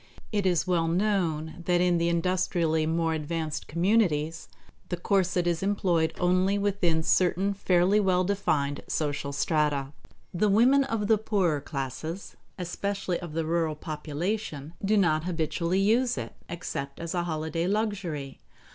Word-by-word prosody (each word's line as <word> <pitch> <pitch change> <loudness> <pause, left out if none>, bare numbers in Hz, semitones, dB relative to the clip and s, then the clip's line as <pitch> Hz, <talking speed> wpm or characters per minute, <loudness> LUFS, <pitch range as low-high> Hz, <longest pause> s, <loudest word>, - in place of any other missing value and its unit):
It 205 -3 +1
is 170 -3 +2
well 170 -3 +1
known 170 -4 0
that 175 -1 +3
in 175 -1 +3
the 170 0 +1
industrially 170 -2 +1
more 165 0 +1
advanced 155 0 -3
communities 170 -3 +1 0.4
the 175 - -2
corset 185 -1 +1
is 170 -2 0
employed 180 -5 +1
only 185 +2 +2
within 190 -5 +1
certain 185 +4 +2
fairly 190 +1 +3
well 185 -3 +2
defined 155 -8 0
social 145 -2 -2
strata. 145 -1 0 0.4
The 205 +4 +2
women 255 +7 +5
of 225 -5 -2
the 215 0 +3
poorer 185 -9 +1
classes, 150 +6 -5 0.2
especially 185 0 -2
of 170 -4 -8
the 165 0 -1
rural 165 -1 0
population, 155 +1 -4
do 210 +2 +3
not 160 -5 +2
habitually 170 +1 -1
use 230 - +2
it, 115 -2 -5 0.2
except 140 -5 -5
as 170 -1 -4
a 175 -1 -1
holiday 160 +1 -2
luxury. 190 -10 -2
175 Hz, 140 wpm, -27 LUFS, 155-195 Hz, 0.4 s, women